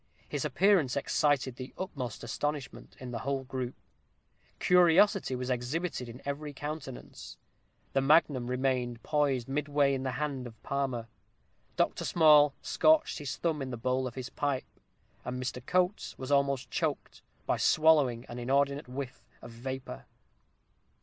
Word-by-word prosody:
His - - -3
appearance 185 -11 +3
excited 140 -2 +1
the 130 +1 -8
utmost 130 - -5
astonishment 145 +4 -4
in 130 -1 -7
the 115 - -3
whole 135 +1 -2
group: 130 -1 -4 0.8
curiosity 180 -2 +4
was 125 +1 -3
exhibited 125 +2 -2
in 120 +3 -11
every 145 +1 -4
countenance 135 - -7 0.6
the 135 - +3
magnum 140 -3 +3
remained 125 -2 -1
poised 140 -5 +1
midway 145 0 +1
in 135 - -1
the 130 -1 -2
hand 135 -2 -3
of 115 -1 -13
Palmer 130 -4 -2 0.7
Dr. - - 0
Small 150 -3 +6
scorched 315 0 +3
his 140 -2 -4
thumb 160 -4 -1
in 135 - -3
the 120 - -5
bowl 130 +2 0
of 120 - -8
his 130 -1 -6
pipe; 140 -3 -1 0.6
and 125 +1 -4
Mr. 125 -1 -4
Coates 180 +6 0
was 130 +2 -6
almost 140 -2 +1
choked, - - -2 0.2
by - - +1
swallowing 145 -7 +4
an 120 - -7
inordinate 140 +3 +1
whiff 125 -1 -7 0.2
of - - -9
vapor. 125 - -6
135 Hz, 145 wpm, -30 LUFS, 125-150 Hz, 0.8 s, Small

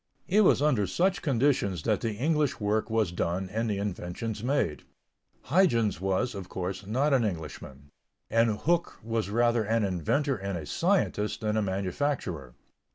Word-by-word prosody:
It 200 +3 +4
was 180 -7 +4
under 125 -10 +2
such 185 - +1
conditions 120 - +1
that - - +1
the 115 -2 -1
English 150 +3 0
work 105 +1 0
was 110 -5 +1
done 90 +2 -2
and 115 +2 -1
the 100 - -1
inventions 100 +2 -4
made. 125 - 0 0.6
Huyghens 120 - +2
was, 95 +6 0
of 95 -3 -7
course, 95 +2 -4
not 135 +7 +1
an 130 -3 +4
Englishman; 75 -7 -6 0.4
and 115 -1 +2
Hooke 170 +1 +1
was 115 -2 -2
rather 120 +1 +2
an 110 +1 +1
inventor 100 - 0
and 100 -1 -3
a 80 - -6
scientist 165 - 0
than 105 0 0
a 110 - +2
manufacturer. 95 - -2
110 Hz, 160 wpm, -28 LUFS, 95-135 Hz, 0.6 s, It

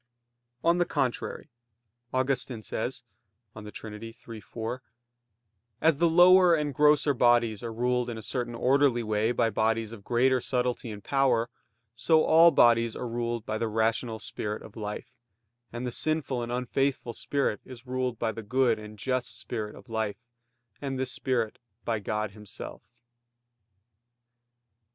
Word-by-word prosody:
On 170 +1 +3
the 175 - +3
contrary, 125 -6 -2 0.6
Augustine 130 -3 -1
says 120 +5 -4 0.5
(De 105 -1 -8
Trin. 105 0 -8
iii, 115 -1 -9
4): 115 +4 -5 1.0
"As 160 -2 +3
the 170 - +4
lower 180 +1 +7
and 150 -2 -1
grosser 150 +1 +4
bodies 120 -4 +3
are 115 - -5
ruled 125 +1 0
in 115 - -5
a 110 - -7
certain 120 +1 -3
orderly 130 0 +3
way 110 +1 +1
by 115 -1 +1
bodies 110 +1 0
of 110 -4 -10
greater 125 +2 +2
subtlety 125 -1 -1
and 105 -2 -8
power; 125 -4 +2 0.4
so 155 +7 +3
all 165 +2 +7
bodies 115 -5 +4
are 125 - -4
ruled 120 -1 -3
by 110 -1 -2
the 115 - 0
rational 110 +1 0
spirit 105 -1 -4
of 105 - -13
life; 105 +2 -6 0.6
and 120 +1 -5
the 125 - -2
sinful 155 -2 -1
and 120 0 -4
unfaithful 125 0 -1
spirit 140 -6 -1
is 130 -1 -12
ruled 125 -1 -2
by 115 -1 -1
the 115 - -7
good 120 +1 +2
and 105 0 -10
just 125 -1 -1
spirit 110 -3 -4
of - - -14
life; 110 -3 -2 0.6
and 135 -2 -3
this 130 0 -1
spirit 120 -4 -1 0.3
by 115 -2 0
God 105 +1 -2
Himself." 105 +3 -11
120 Hz, 150 wpm, -28 LUFS, 110-130 Hz, 1.0 s, lower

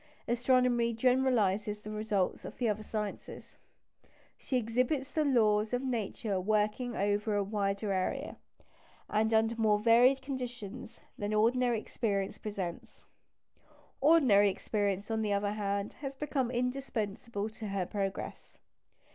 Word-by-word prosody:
Astronomy 245 -1 +2
generalises 220 -5 +2
the 215 - -6
results 210 -3 -1
of - - -8
the 245 - 0
other 215 0 0
sciences. 210 -1 -6 0.8
She 260 - -2
exhibits 255 +4 0
the 310 - +1
laws 220 -5 +3
of 245 +1 0
Nature 220 -5 -2
working 215 +4 0
over 205 +2 0
a 205 - +2
wider 200 0 -1
area, 185 -1 -2 0.7
and 220 +1 +2
under 225 +1 +3
more 215 -2 +3
varied 240 +5 +5
conditions, 245 -4 -6 0.2
than 210 0 -1
ordinary 240 +2 +3
experience 200 -3 -2
presents. 190 -5 -6 0.9
Ordinary 265 -10 +5
experience, 200 +1 -2
on 220 0 0
the 210 -2 0
other 200 0 0
hand, 200 -1 -2
has 275 -2 -5
become 270 -3 -1
indispensable 240 -4 -2
to 215 0 -7
her 195 -2 -1
progress. 195 0 -5
220 Hz, 125 wpm, -31 LUFS, 205-245 Hz, 0.9 s, varied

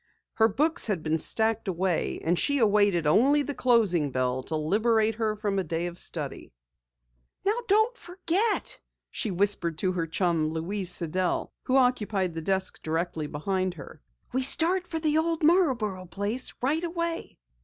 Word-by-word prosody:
Her 220 - +4
books 305 +10 0
had 190 -7 -2
been 160 +1 0
stacked 220 +4 0
away, 180 -2 -1
and 170 +2 +1
she 285 - +2
awaited 205 - +3
only 270 - +4
the 285 - -4
closing 210 - +2
bell 130 0 -1
to 160 - -4
liberate 220 +8 +1
her 220 -1 -1
from 205 -2 -2
a - - -1
day 165 +1 -3
of 175 0 -5
study. - - -2 0.9
"Now 425 +4 +1
don't 440 +4 +3
forget!" 375 +2 -1 0.3
she 220 - -2
whispered 185 -4 0
to 185 +2 0
her 170 -3 -2
chum, 160 -2 0
Louise 185 +3 -2
Sidell, 180 +2 +1
who 260 - +2
occupied 210 -8 +1
the 165 - -5
desk 190 +3 -2
directly 160 -1 -3
behind. 185 +3 -3 0.5
"We 260 - +1
start 350 +7 +4
for 325 - -4
the 310 -1 +1
old 330 0 -1
Marborough 245 - +2
place 205 +8 -2
right 305 +6 +1
away!" 335 -1 -4
205 Hz, 155 wpm, -27 LUFS, 175-280 Hz, 0.9 s, Her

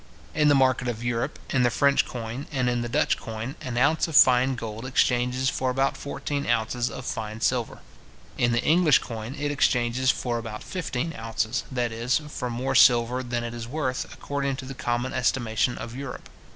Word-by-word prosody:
In 150 -1 +3
the 145 - +6
market 130 -1 +3
of 120 -1 -3
Europe, 120 -1 -2
in 130 - +2
the 120 - +4
French 140 +3 +3
coin 120 +3 -6
and 130 -4 0
in 120 -1 0
the 120 - -3
Dutch - - +2
coin, 115 +4 -6
an 125 -2 -4
ounce 145 +7 +3
of 160 - -5
fine 130 0 +6
gold 115 -1 -6
exchanges 125 0 +1
for 130 -1 0
about 135 +2 +1
fourteen 145 0 -4
ounces 120 +1 0
of 125 - -8
fine 110 0 -4
silver. 120 -1 -1 0.5
In 120 - +2
the 120 0 +1
English 160 -3 +5
coin, 115 +3 -6
it 145 0 -2
exchanges 125 -2 +1
for 120 -2 0
about 110 -2 -7
fifteen 165 -3 -3
ounces, 115 +1 -2
that 120 -2 -1
is, 115 +3 0
for 125 -4 -4
more 125 +3 -2
silver 120 +1 +5
than 120 -1 -3
it 120 0 -5
is 115 -1 -6
worth, 130 -1 -3
according 140 -1 -3
to 130 - -7
the 135 - -6
common 120 0 -2
estimation 120 -1 0
of 115 +1 -7
Europe. 135 -1 -7
125 Hz, 190 wpm, -25 LUFS, 120-135 Hz, 0.5 s, the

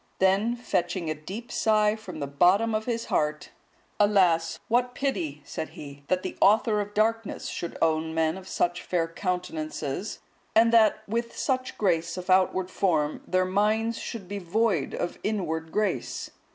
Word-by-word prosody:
Then 195 +5 +3
fetching 175 -7 -1
a - - +1
deep 195 +10 -8
sigh 215 -1 +3
from 185 -7 -9
the 145 - -2
bottom 185 +11 +3
of 215 0 -1
his 230 -2 -2
heart, 150 0 -1 0.5
"Alas! 180 -6 +3
what 245 +2 +1
pity," 155 - -2
said 160 - -5
he, 140 -1 -9
"that 185 0 +1
the - - -4
author 210 +1 +4
of 205 0 -7
darkness 225 +1 0
should 170 - -5
own 160 0 +1
men 160 0 +2
of 190 0 -10
such 175 -1 0
fair 170 -2 0
countenances; 165 -1 -3 0.4
and 230 +1 +5
that 220 -2 +5
with 235 +2 -3
such 255 -2 -1
grace 170 -4 +1
of 180 +1 -2
outward 185 0 +3
form, 155 -7 +1
their 185 0 +2
minds 215 +4 +1
should 220 -6 -6
be 200 +1 -4
void 195 -2 0
of 175 - -3
inward 160 -6 -2
grace." 215 0 -2
190 Hz, 160 wpm, -27 LUFS, 165-220 Hz, 0.5 s, and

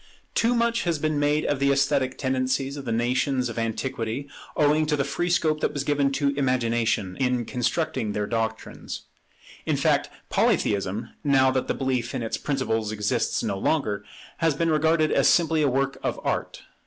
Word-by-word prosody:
[Neither - - -26
in - - -25
Polytheism] - - -34
Too 235 +2 +2
much 235 0 +1
has 170 -2 +1
been 155 0 0
made 145 +1 +2
of 145 - 0
the 140 0 +3
esthetic 135 -1 +1
tendencies 130 +1 -1
of 140 -2 -7
the 115 - -2
nations 125 +2 +1
of 115 - -4
antiquity, 115 +3 -3 0.3
owing 150 +1 +3
to 150 - +2
the 140 - +1
free 175 +5 -2
scope 155 -3 +1
that - - 0
was 145 -2 -2
given 140 -1 +1
to 140 +1 +1
Imagination 115 -7 0
in 125 -2 0
constructing 125 -1 -1
their 105 0 -1
doctrines. 110 0 -4 0.6
In - - +1
fact - - +2 0.2
Polytheism, 100 +3 +1
now 135 -3 +4
that 130 -1 -1
the - - 0
belief 130 -2 -1
in 125 - -2
its 115 - -2
principles 115 -7 -1
exists 105 -1 0
no 95 - -2
longer, 105 -7 0 0.4
has 165 -3 +2
been 165 +2 +1
regarded 155 0 +3
as - - +4
simply 165 -2 +3
a 145 - +3
work 135 +1 -1
of - - -2
art. - - -2
135 Hz, 190 wpm, -25 LUFS, 115-150 Hz, 0.6 s, now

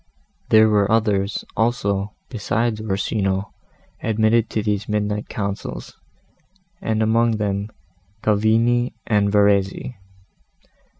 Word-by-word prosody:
There 110 0 +6
were 105 -1 +2
others, 105 -3 +1
also, 105 -3 0
besides 115 0 -1
Orsino, 95 -1 -1 0.5
admitted 110 +1 +2
to 110 - -2
these 105 0 -2
midnight 105 0 -1
councils, 100 -2 -5 0.9
and 110 0 0
among 115 +1 +2
them 100 0 -2 0.5
Cavigni 115 +3 +2
and 105 -2 +2
Verezzi. 100 +3 +1
105 Hz, 95 wpm, -21 LUFS, 100-110 Hz, 0.9 s, There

